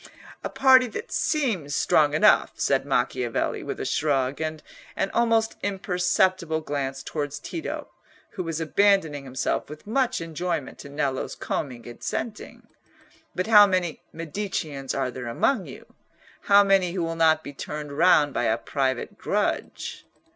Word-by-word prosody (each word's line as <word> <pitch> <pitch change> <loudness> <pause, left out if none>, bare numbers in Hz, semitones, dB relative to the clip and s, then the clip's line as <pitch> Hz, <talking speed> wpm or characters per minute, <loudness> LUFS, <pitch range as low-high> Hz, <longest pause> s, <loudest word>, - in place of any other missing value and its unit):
"A - - -3
party 260 -1 +5
that 225 - -7
seems 210 - 0
strong 150 -1 +3
enough," - - +4
said - - 0
Macchiavelli, 120 -2 0
with - - -5
a - - -3
shrug, 140 -2 0
and 155 0 -4 0.3
an 195 - -1
almost 230 -1 +2
imperceptible 180 -3 +1
glance 135 -3 -3
towards 145 -2 -4
Tito, 330 - -5 0.4
who 190 - -5
was 165 -2 -3
abandoning 160 -4 +2
himself 130 +1 -2
with 150 0 -10
much 255 +3 0
enjoyment 165 -2 -4
to 140 - -9
Nello's 140 -2 -2
combing 125 -5 -4
and 120 - -11
scenting. 220 -1 -5 0.7
"But 185 - -1
how 210 -2 +8
many 180 -4 -1
Mediceans 160 -5 -4
are 130 -2 -1
there 125 -1 -7
among 185 - 0
you? - - -11 0.6
How 200 0 +8
many 195 -3 +3
who 180 -2 -1
will 165 0 -2
not 160 -1 +3
be 145 - -8
turned 150 +1 -6
round 150 -3 +4
by 120 - 0
a 110 0 +2
private 130 0 -2
grudge?" - - -2
160 Hz, 145 wpm, -25 LUFS, 140-195 Hz, 0.7 s, how